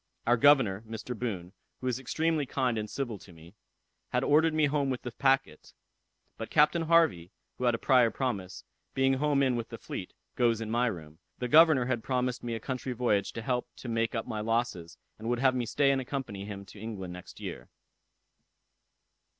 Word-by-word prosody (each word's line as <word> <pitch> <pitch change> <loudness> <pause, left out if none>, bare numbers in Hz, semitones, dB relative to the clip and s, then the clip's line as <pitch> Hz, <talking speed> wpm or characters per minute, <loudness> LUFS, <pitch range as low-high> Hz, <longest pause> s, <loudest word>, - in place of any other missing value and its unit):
Our 120 - +4
governor, 125 -7 +4
Mr. 115 +2 -5
Boon, 100 -6 -4 0.3
who - - -8
is 125 -1 0
extremely 155 +2 0
kind 130 -3 0
and 105 0 -5
civil 120 -7 -4
to 95 - -15
me, 85 +1 -15 0.6
had - - 0
ordered 160 +3 +4
me 155 -1 +4
home 145 -1 0
with 130 -2 -3
the 125 - -5
packet; 135 - 0 0.7
but - - -5
Captain 150 +3 +4
Harvey, 160 - +3 0.3
who 125 - -1
had 120 -1 +3
a - - -3
prior 125 -1 +4
promise, 105 -6 -3 0.3
being 135 0 +2
come 145 -1 +2
in 130 -2 +2
with 115 -1 -4
the - - -7
fleet, - - -7 0.2
goes 115 -2 +2
in 110 -1 -4
my 120 +2 +2
room. 80 -7 -6 0.2
The 125 - -3
governor 155 -2 +6
had 120 -3 -1
promised 125 -1 -1
me 120 -1 -3
a - - -4
country 130 +1 -4
voyage 110 -5 +1
to 115 - -6
help 125 0 -1
to - - -10
make 115 0 0
up 115 - -2
my 110 -3 -4
losses, 110 -7 -2 0.2
and 110 +2 -4
would 120 - +1
have 130 +1 +3
me 125 -2 -2
stay 140 +3 +3
and 135 -1 +1
accompany 125 -7 -5
him 100 -1 -7
to 100 - -13
England 100 -5 -6
next 90 0 -11
year." - - -7
120 Hz, 200 wpm, -29 LUFS, 110-135 Hz, 0.7 s, governor